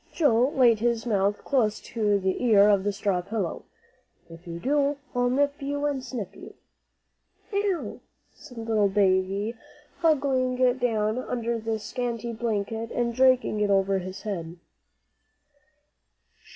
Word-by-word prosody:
Joel 260 -3 +2
laid 240 -5 +5
his 235 0 0
mouth 205 -2 0
close 220 -6 +1
to 210 -3 0
the 190 +4 -1
ear 210 -4 +6
on 200 -2 +4
the 205 +1 -1
straw 200 -2 -1
pillow; 195 -2 -4 0.7
"if 165 +2 -13
you 170 0 -5
do, 285 +6 +1 0.2
I'll 245 -1 +1
nip 285 +3 0
you 285 +1 -2
and 280 -3 -1
snip 210 -7 -6
you." - - -12 1.0
"Ow!" 400 -3 -1 0.3
said 245 - -14
little 220 -3 +1
Davie, 195 +2 +1 0.4
huddling 270 -6 +2 0.2
down 220 -1 0
under 235 -2 -2
the 225 0 -2
scanty 235 +2 -4
blanket 225 0 -2
and 235 -1 -1
dragging 255 -3 +3
it 210 -1 +1
over 195 0 +2
his 185 +1 -8
head. 175 -5 -5
225 Hz, 135 wpm, -26 LUFS, 200-255 Hz, 1.0 s, ear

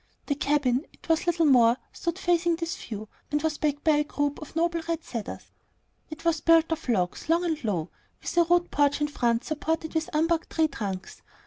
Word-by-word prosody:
The 285 - 0
cabin 285 -1 +1
it - - -19
was 325 +2 +2
little 335 -1 +3
more 245 -4 +5 0.2
stood 340 +1 -3
facing 345 -2 +2
this 335 0 -3
view, 215 -1 -7 0.2
and 295 - +2
was 315 -2 -1
backed 290 -1 -1
by 310 -2 +4
a 295 - +3
group 290 0 -2
of 305 - -10
noble 335 0 +1
red 330 -1 -1
cedars. 230 -4 -6 0.6
It 310 +1 -9
was 330 -2 +2
built 330 0 +4
of 320 -4 -3
logs, 185 - 0
long 340 +2 +3
and 320 -4 -2
low, 180 -7 -2 0.3
with - - -5
a 345 - +6
rude 350 +1 +2
porch 285 0 +2
in 295 0 0
front 235 -4 +1
supported 320 +1 -2
on 320 - +3
unbarked 325 +2 +1
tree 320 -1 +2
trunks. 195 -7 -5
310 Hz, 205 wpm, -27 LUFS, 275-330 Hz, 0.6 s, a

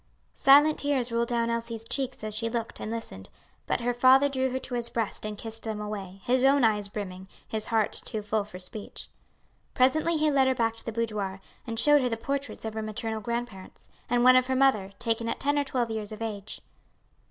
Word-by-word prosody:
'" - - -41
Silent 290 +3 +6
tears 270 -4 0
rolled 235 0 +1
down 235 -1 0
Elsie's 230 -1 -4
cheeks 265 -4 -2
as 215 0 -3
she 230 +2 0
looked 230 -1 -4
and - - -5
listened; 225 - -6 0.4
but - - 0
her 245 +1 0
father 260 +3 +6
drew 265 -1 0
her 255 - -2
to 260 - -7
his 240 -1 -1
breast 220 -2 -3
and 210 -1 -6
kissed 225 +1 -5
them 220 -2 -4
away, 200 -2 -6
his 255 +1 +2
own 275 0 +5
eyes 210 -2 +2
brimming, 190 -2 -7 0.2
his 220 -1 -2
heart 225 -2 +1
too 215 -1 -4
full 210 0 0
for 200 -2 -10
speech. 185 +3 -7 0.7
Presently 310 +6 +3
he 305 0 +2
led 270 -2 +4
her 260 - +2
back 225 -1 0
to - - -1
the - - -1
boudoir, 210 -4 -2 0.3
and 225 -1 0
showed 295 +1 +6
her 250 - +1
the 225 - -2
portraits 275 +1 -4
of 220 - -4
her 220 - -3
maternal 220 +1 -4
grandparents, 235 -4 -6 0.2
and 245 0 +2
one 255 0 +8
of 255 0 +4
her 260 - 0
mother, 255 -8 +3
taken 230 0 -1
at - - -3
ten 290 +1 +1
or - - +2
twelve 245 -4 -1
years 220 -1 -4
of 215 - -7
age. 215 -2 -5
230 Hz, 220 wpm, -27 LUFS, 215-255 Hz, 0.7 s, one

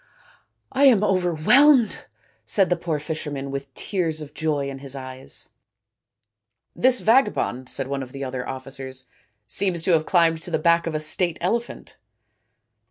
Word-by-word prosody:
" - - -44
I 275 +2 +3
am 230 -7 +5
overwhelmed," 205 - +3 0.4
said 180 - +2
the - - +4
poor 170 -2 -3
fisherman, 145 -2 -5
with 140 0 -6
tears 165 -6 -1
of 150 -2 -8
joy 150 -3 -1
in 135 -1 -6
his 135 0 -6
eyes. 130 0 -8 0.6
" - - -60 0.2
This 255 -1 +3
vagabond," 210 - +1
said - - -1
one 140 +1 -3
of 130 -1 -8
the 140 +1 -6
other 130 -1 -5
officers, 130 0 -8 0.2
" 105 0 -48
seems 175 - 0
to 185 - +1
have 160 -2 +2
climbed 165 -3 +3
to 175 - -6
the 170 - 0
back 170 +1 +2
of 160 - -3
a - - 0
state 165 +2 +1
elephant." 230 +7 -3
155 Hz, 165 wpm, -23 LUFS, 135-185 Hz, 0.6 s, am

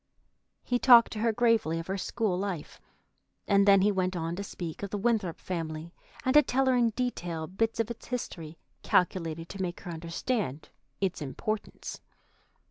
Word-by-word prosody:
He 245 0 0
talked 240 -3 +7
to 215 - -5
her 230 +1 +2
gravely 225 -8 +2
of 165 - -4
her 190 - -2
school 210 0 -1
life, 185 -5 -4 0.7
and 200 0 +4
then 195 -1 +7
he 205 +2 +4
went 185 -1 0
on 165 0 -2
to 200 - -4
speak 170 -4 -6
of 200 - -4
the 205 - -3
Winthrop 210 -5 0
family, 165 -1 -5 0.3
and 260 - +3
to 300 - +9
tell 270 -1 +1
her 260 -1 +3
in 240 -2 +4
detail 175 -9 -3
bits 225 +7 -1
of 230 +1 0
its 235 - -9
history 165 -10 -5 0.2
calculated 165 -3 +1
to 195 - -6
make 175 -2 -3
her 175 - -6
understand 165 - -3 0.3
its 190 -4 -1
importance. 205 +9 -4
195 Hz, 175 wpm, -29 LUFS, 170-230 Hz, 0.7 s, to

